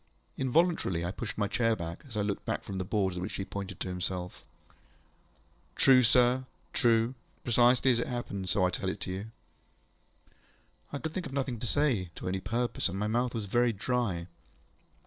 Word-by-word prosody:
ŌĆØ - - -25
Involuntarily 130 - +2
I 90 - -1
pushed 110 +3 -5
my 100 -1 +1
chair 115 +1 +2
back, 85 -3 -6
as 115 -5 -7
I 105 - +2
looked 100 -1 -2 0.2
from 95 -1 -5
the - - 0
boards 95 -1 0
at - - -3
which 95 - -4
he 95 - -3
pointed 100 -2 -6
to - - -1
himself. 90 0 -4 1.3
ŌĆ£True, 130 -2 +6
sir. 125 +2 +4 0.3
True. 115 -1 +3 0.3
Precisely 125 +2 +4
as 120 - +2
it - - -1
happened, 100 -6 -4
so 95 0 +3
I 90 - +2
tell 95 - -2
it - - -4
you. 95 +2 -4
ŌĆØ 110 - -12 1.6
I - - -1
could 160 +2 -4
think 180 -4 -3
of 135 - -9
nothing 135 -4 -1
to 120 - -3
say, 125 - +1
to - - -6
any 95 +1 0
purpose, 115 +3 -1
and 95 - -4
my 105 - -1
mouth 120 +3 0
was 110 -2 -2
very 120 +4 +2
dry. 105 -5 -1
110 Hz, 190 wpm, -30 LUFS, 95-125 Hz, 1.6 s, ŌĆ£True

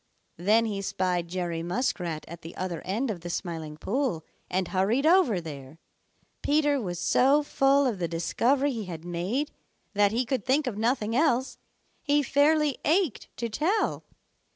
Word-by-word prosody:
Then 215 +7 +3
he 205 -3 -2
spied 180 -3 -1
Jerry 170 -2 -3
Muskrat 175 -4 -2
at 170 +1 -9
the 165 - -10
other 180 -3 -3
end 220 +6 -1
of 180 -5 -6
the 175 - -6
Smiling 160 -4 -4
Pool 225 - -1 0.2
and 185 -1 -1
hurried 210 +9 +1
over 320 - +4
there. 145 -3 -9 0.6
Peter 290 -2 +2
was 175 -4 -4
so 270 - +3
full 275 0 +3
of 230 -7 -1
the 170 - 0
discovery 240 - +1
he 225 -5 -4
had 165 -2 -7
made 185 - -2 0.4
that 205 -1 +3
he 240 +3 0
could 250 -3 -1
think 280 +3 +2
of 250 -5 -3
nothing 225 0 0
else. 265 -3 +1 0.4
He 290 0 +2
fairly 290 +1 +3
ached 330 - +1
to 235 - -2
tell. 330 - 0
215 Hz, 160 wpm, -27 LUFS, 175-275 Hz, 0.6 s, over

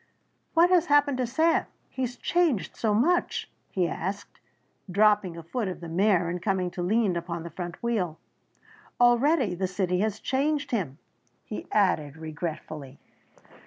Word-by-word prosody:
"What 345 +2 +5
has 360 -3 +4
happened 290 -2 +3
to 250 - +1
Sam 320 +7 +2 0.2
he 260 - -7
has 250 -1 -2
changed 325 - 0
so 215 -2 +1
much?" 345 +11 +1 0.2
he 180 -3 0
asked, 200 +5 -5 0.5
dropping 205 -2 +3
a 165 - -8
foot 210 +6 -3
of 185 - -5
the 170 - -8
mare 180 0 +3
and 175 +1 -3
coming 185 -2 0
to 175 - -5
lean 200 +1 +2
upon 170 -1 -4
the 170 - -8
front 175 +1 -5
wheel. 190 -9 -1 0.8
"Already 245 - +4
the 185 +2 -1
city 180 -1 -1
has 215 0 0
changed 285 +2 0
him," 170 - -2 0.5
he 210 - -6
added 160 -8 +1
regretfully. 155 -3 -6
200 Hz, 155 wpm, -27 LUFS, 175-245 Hz, 0.8 s, What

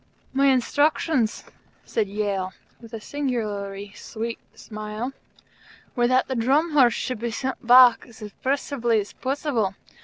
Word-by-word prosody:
"My 275 +1 +3
instructions," 280 -1 +1 0.4
said 220 -3 -1
Yale, 200 -2 -2 0.3
with 230 -2 -14
a 225 - -6
singularly 210 -7 -4
sweet 230 +1 -6 0.2
smile, 215 +4 -6 0.8
"were 240 -1 +3
that 255 +1 +2
the 265 - -2
Drum 275 +8 +2
Horse 260 -5 +5
should 255 -4 -3
be 235 +1 -2
sent 250 +1 -4
back 250 0 +7
as 235 - -16
impressively 240 +1 -1
as 205 - -6
possible. 260 -7 -1
240 Hz, 130 wpm, -24 LUFS, 215-265 Hz, 0.8 s, back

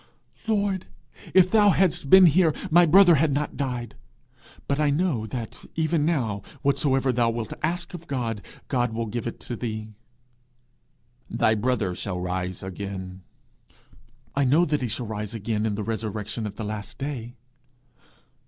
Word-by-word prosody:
'Lord, 200 -4 0 0.4
if 185 -1 +5
thou 210 -2 +6
hadst 180 -7 +2
been 190 +2 +9
here, 165 -1 +4 0.2
my 175 +1 +6
brother 180 +2 +7
had 155 0 +3
not 145 +2 -2
died. 125 -5 -3 0.7
But 140 +1 0
I 150 -1 +3
know, 145 -7 0
that 115 -2 -6
even 160 -1 +1
now, 115 -12 0 0.2
whatsoever 135 -1 +2
thou 120 -1 +2
wilt 115 -1 -3
ask 175 +4 -2
of 170 -1 -9
God, 115 -7 -2 0.3
God 120 -3 0
will 115 +1 -2
give 115 +2 -4
it 115 - -6
thee.' 110 -2 -5 1.4
'Thy 110 - +2
brother 110 -4 0
shall 90 0 -4
rise 90 0 -3
again.' 95 -1 -6 1.1
'I 140 - +2
know 150 +7 +4
that 150 -2 0
he 125 - -1
shall 120 +2 -3
rise 105 0 -5
again 110 0 -1
in 105 - -1
the 105 - -3
resurrection 110 0 -3
at 105 - -8
the 110 - -5
last 105 0 -6
day.' 130 -4 -5
125 Hz, 155 wpm, -25 LUFS, 110-155 Hz, 1.4 s, been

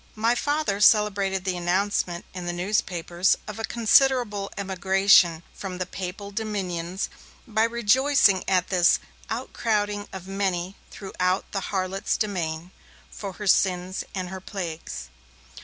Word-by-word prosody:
My 225 +2 +2
Father 290 -5 0
celebrated 200 -3 +3
the 185 -1 0
announcement 175 0 0
in 180 -1 -6
the 175 - -1
newspapers 180 -1 0
of 210 0 -7
a - - -4
considerable 235 -3 +3
emigration 190 -3 +3
from 190 -2 -6
the 185 - -2
Papal 190 +2 -6
Dominions 190 -4 -3 0.4
by 220 -1 +2
rejoicing 235 -2 +3
at 185 -1 +2
'this 180 -2 +4 0.3
outcrowding 210 -3 -1
of 190 -1 -8
many, 190 -1 -2
throughout 185 -1 -2
the 195 - -3
harlot's 195 +1 -1
domain, 175 -4 -3 0.4
from 195 -3 -7
her 210 - -7
sins 185 -1 +2
and 185 -1 -3
her 190 0 -7
plagues'. 170 - -6
195 Hz, 125 wpm, -25 LUFS, 180-210 Hz, 0.4 s, this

